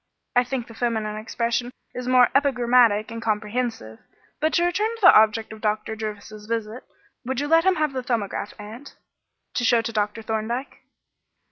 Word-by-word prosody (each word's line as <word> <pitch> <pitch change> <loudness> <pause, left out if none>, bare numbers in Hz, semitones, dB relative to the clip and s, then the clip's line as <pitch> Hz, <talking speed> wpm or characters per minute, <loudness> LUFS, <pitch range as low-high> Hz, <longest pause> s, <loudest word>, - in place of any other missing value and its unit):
"I 245 - +5
think 250 -1 -4
the 230 - -13
feminine 220 -2 -2
expression 235 +3 -2 0.2
is 250 0 -6
more 255 -1 +5
epigrammatic 245 -6 +3
and 230 0 -6
comprehensive. 215 - -3 0.4
But 315 +1 +1
to 345 - +3
return 400 +5 +1
to 455 - -14
the 365 - +9
object 220 0 +3
of 220 - -12
Dr. 215 +1 -1
Jervis's 215 -1 -7
visit. 225 +1 -4 0.4
Would 260 +1 -3
you 290 - -2
let 330 +2 +4
him 380 -1 +4
have 305 -4 0
the 260 - -2
'Thumbograph,' 220 -4 -3
aunt, 220 +7 -10 0.6
to - - -1
show 240 -2 +3
to 230 - -4
Dr. 210 +1 -1
Thorndyke?" 225 +4 -3
230 Hz, 170 wpm, -24 LUFS, 215-255 Hz, 0.6 s, the